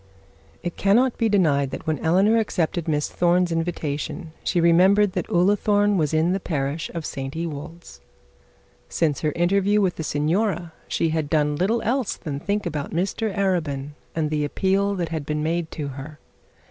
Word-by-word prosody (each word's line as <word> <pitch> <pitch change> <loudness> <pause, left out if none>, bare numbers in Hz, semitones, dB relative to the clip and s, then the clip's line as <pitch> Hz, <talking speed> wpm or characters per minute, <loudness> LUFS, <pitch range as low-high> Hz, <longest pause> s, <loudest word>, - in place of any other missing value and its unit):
It 175 - -4
cannot 235 +6 +3
be 225 - +2
denied 150 -9 +2
that - - -7
when 155 -3 -1
Eleanor 195 +7 +3
accepted 175 -5 -1
Miss 150 -2 0
Thorne's 175 0 +2
invitation, 165 0 -3
she 175 - +1
remembered 185 +4 +5
that 180 -1 -3
Ullathorne 205 +3 +3
was 155 -5 +1
in 160 +2 +2
the 195 - 0
parish 150 -2 -2
of 165 -2 -4
St 135 +1 -5
Ewold's. 160 - -7 0.9
Since 150 -5 0
her 155 - +1
interview 200 +4 +2
with 190 -3 +1
the 160 - -3
signora 170 +4 0
she 165 - 0
had 155 -2 -1
done 150 -2 +2
little 205 +9 0
else 250 -1 0
than 145 -5 -5
think 205 +5 -2
about 150 -4 -3
Mr 195 +5 -1
Arabin, 155 -8 -1 0.2
and 155 -2 -1
the 150 -1 0
appeal 195 +6 +1
that 175 -3 -2
had 160 -2 -3
been 150 +1 -2
made 165 +1 -1
to 145 -3 -4
her. 140 +3 -8
170 Hz, 170 wpm, -23 LUFS, 150-195 Hz, 0.9 s, remembered